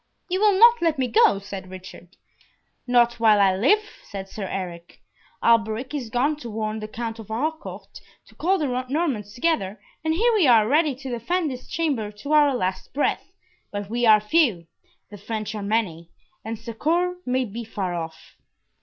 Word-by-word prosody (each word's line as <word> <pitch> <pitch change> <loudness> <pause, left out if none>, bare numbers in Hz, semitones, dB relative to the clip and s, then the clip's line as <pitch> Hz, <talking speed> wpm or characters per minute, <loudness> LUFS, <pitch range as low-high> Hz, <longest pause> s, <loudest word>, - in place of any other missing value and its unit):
"You 370 +1 0
will 415 -3 +4
not 470 +3 +7
let 330 -3 +1
me 260 -1 0
go?" 225 -3 +4
said 195 -1 -8
Richard. 185 -1 -12 0.7
"Not 240 -1 +3
while 215 -2 +5
I 195 -2 +4
live," 285 - +3 0.2
said 195 -2 -8
Sir 195 0 -6
Eric. 175 -3 -6 0.4
"Alberic 230 +3 +2
is 265 -6 -4
gone 275 +6 +1
to 240 -6 -8
warn 215 0 -3
the 215 - -6
Count 225 +1 -5
of 220 - -9
Harcourt, 305 +9 -5 0.2
to - - -20
call 375 +4 +1
the 255 -5 -1
Normans 260 - -2
together, 245 - 0 0.2
and 320 0 +1
here 470 +6 +3
we 395 -9 +4
are 225 -4 +5
ready 295 +1 +2
to 265 0 -7
defend 305 +7 -1
this 250 -1 -8
chamber 275 -11 -1
to 215 +8 -7
our 290 -3 +5
last 185 +2 -3
breath, 290 - -1 0.4
but 205 0 -5
we 240 0 +1
are 215 -1 +8
few, 210 - +2 0.5
the 205 - -10
French 215 +1 -4
are 210 - -5
many, 200 -6 -1 0.3
and 225 +1 -5
succour 335 +12 -1
may 255 +1 +1
be 230 +2 -6
far 200 -5 -4
off." 160 -2 -7
230 Hz, 180 wpm, -24 LUFS, 205-295 Hz, 0.7 s, are